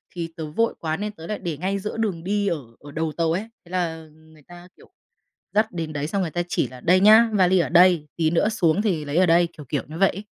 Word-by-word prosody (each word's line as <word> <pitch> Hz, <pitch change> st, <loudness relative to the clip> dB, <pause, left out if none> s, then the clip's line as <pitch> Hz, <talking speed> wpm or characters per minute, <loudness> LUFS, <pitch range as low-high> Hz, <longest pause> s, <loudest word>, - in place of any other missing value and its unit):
thì 170 Hz, -1 st, -4 dB
tớ 160 Hz, -, -4 dB
vội 230 Hz, +9 st, +1 dB
quá 160 Hz, -1 st, -2 dB
nên 210 Hz, +1 st, -4 dB
tớ 165 Hz, -5 st, -11 dB
lại 210 Hz, -, -4 dB
để 165 Hz, -4 st, -4 dB
ngay 190 Hz, +5 st, -2 dB
giữa 210 Hz, +3 st, -5 dB
đường 195 Hz, -7 st, -2 dB
đi 205 Hz, +1 st, -1 dB
ở 170 Hz, -, 0 dB, 0.2 s
ở 145 Hz, -, -12 dB
đầu 160 Hz, +1 st, -2 dB
tàu 165 Hz, -1 st, +1 dB
ấy. 200 Hz, +7 st, -3 dB, 0.2 s
Thế 170 Hz, -, -16 dB
là 165 Hz, -3 st, -2 dB
người 155 Hz, 0 st, -21 dB
ta, 175 Hz, 0 st, -13 dB
kiểu, -, -, -19 dB, 0.6 s
dắt 215 Hz, +1 st, +2 dB
đến 165 Hz, -3 st, -5 dB
đấy 145 Hz, 0 st, -3 dB
xong 195 Hz, +4 st, -1 dB
người 170 Hz, -, -2 dB
ta 175 Hz, -, -1 dB
chỉ -, -, 0 dB
là 130 Hz, -, -12 dB
"Đây 180 Hz, +6 st, +4 dB
nhá, 220 Hz, +3 st, +7 dB
vali 185 Hz, -2 st, +4 dB
ở 160 Hz, -, 0 dB
đây, 175 Hz, -2 st, +5 dB
tí 160 Hz, -2 st, +1 dB
nữa 175 Hz, +6 st, +2 dB
xuống 180 Hz, -5 st, +1 dB
thì 180 Hz, -8 st, -1 dB
lấy 145 Hz, +2 st, -3 dB
ở 185 Hz, -, +5 dB
đây." 170 Hz, 0 st, +4 dB
Kiểu, 150 Hz, -, -10 dB
kiểu, 145 Hz, -, -1 dB
như 160 Hz, +2 st, -8 dB
vậy 195 Hz, +1 st, +4 dB
ấy. 200 Hz, -, -7 dB
175 Hz, 270 wpm, -23 LUFS, 160-195 Hz, 0.6 s, nhá